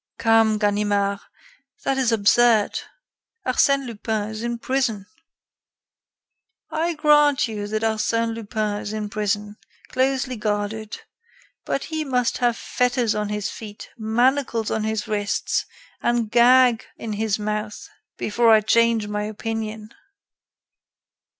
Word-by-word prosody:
"Come, 225 -1 +3
Ganimard, 205 -1 +1 0.6
that 270 - +1
is 250 -3 +2
absurd. 225 0 +3 0.7
Arsène 275 +2 +2
Lupin 220 -2 -3
is 220 0 -6
in 235 0 -2
prison." 235 -5 -1 1.7
"I 330 +2 -1
grant 295 -3 +4
you 210 -2 -5
that 215 +1 -2
Arsène 225 +1 0
Lupin 215 -2 -3
is 205 - -5
in 210 -1 -4
prison, 210 0 -2 0.3
closely 260 -1 0
guarded; 210 0 -3 0.7
but 275 - -2
he 315 -1 -3
must 250 -4 0
have 240 -2 +1
fetters 245 -2 0
on 210 -1 -2
his 210 -1 -3
feet, 210 -2 -10
manacles 235 +1 +1
on 220 -1 -1
his 220 -1 -2
wrists, 205 -1 -1 0.3
and 240 -3 0
gag 245 0 +5
in 220 -2 -5
his 215 0 0
mouth 210 0 -4 0.3
before 230 +2 +2
I 220 -1 +7
change 230 0 +2
my 210 0 -2
opinion." 220 0 -5
220 Hz, 120 wpm, -23 LUFS, 210-240 Hz, 1.7 s, I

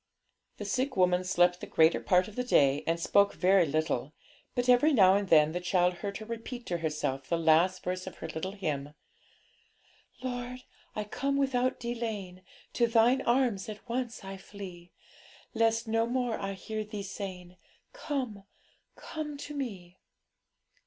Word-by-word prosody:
The - - -6
sick 260 -2 -1
woman 180 0 +3
slept 180 -1 +2
the - - -6
greater 160 +1 +4
part 180 -1 +3
of 215 - -11
the 250 - -1
day, 145 - +3
and 165 +1 +1
spoke 200 +4 +3
very 185 -2 +4
little; 155 -2 -1 0.4
but 245 0 0
every 250 +5 +5
now 190 -6 +6
and 200 -1 0
then 155 -1 +6
the 175 - -2
child 180 0 +2
heard 200 +2 -4
her 215 - -8
repeat 230 +2 -6
to 175 -1 -2
herself 150 -4 -2
the 170 - +2
last 165 +3 +3
verse 185 +1 -3
of 185 - -7
her - - -7
little 160 +4 -4
hymn 150 -7 -4 1.3
'Lord, 250 0 -4 0.3
I 215 - -2
come 275 +6 -2
without 255 -2 +1
delaying, 220 -6 -4 0.3
To 235 - +3
Thine 235 +3 +4
arms 235 -5 +2
at 215 +3 -9
once 240 -2 -3
I 195 0 -7
flee, 185 -3 -10 0.6
Lest 225 0 +2
no 225 +1 +1
more 245 -1 0
I 195 0 -3
hear 215 +3 -5
Thee 210 -1 -6
saying, 185 -2 -7 0.4
"Come, 255 - -4 0.5
come 300 -2 -6
to 290 +1 -7
Me."' 195 -11 -6
200 Hz, 160 wpm, -30 LUFS, 180-240 Hz, 1.3 s, now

